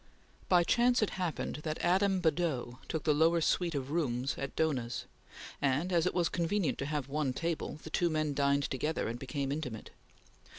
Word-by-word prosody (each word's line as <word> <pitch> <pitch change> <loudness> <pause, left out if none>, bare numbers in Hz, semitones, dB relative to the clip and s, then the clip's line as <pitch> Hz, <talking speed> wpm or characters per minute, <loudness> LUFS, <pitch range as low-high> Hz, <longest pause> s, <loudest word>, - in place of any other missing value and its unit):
By 180 -2 +6
chance 245 +4 +3
it 215 - 0
happened 180 -6 -3
that 155 +1 -3
Adam 190 +1 +2
Badeau 155 -7 0
took 160 - -3
the 155 - +3
lower 165 +3 +4
suite 170 0 +1
of 135 0 -3
rooms 135 -5 0
at 140 - -5
Dohna's, 130 -7 -1 0.6
and, 145 +7 +1
as 170 0 +3
it - - -1
was 175 -2 +3
convenient 175 0 0
to 140 - -2
have 150 -3 -2
one 140 -2 -1
table, 165 +2 -3
the 160 - -8
two 175 +1 +2
men 155 -2 0
dined 140 0 +2
together 150 +4 -1
and 115 +2 -4
became 135 +1 -3
intimate. 130 -7 -5
155 Hz, 180 wpm, -32 LUFS, 140-170 Hz, 0.6 s, By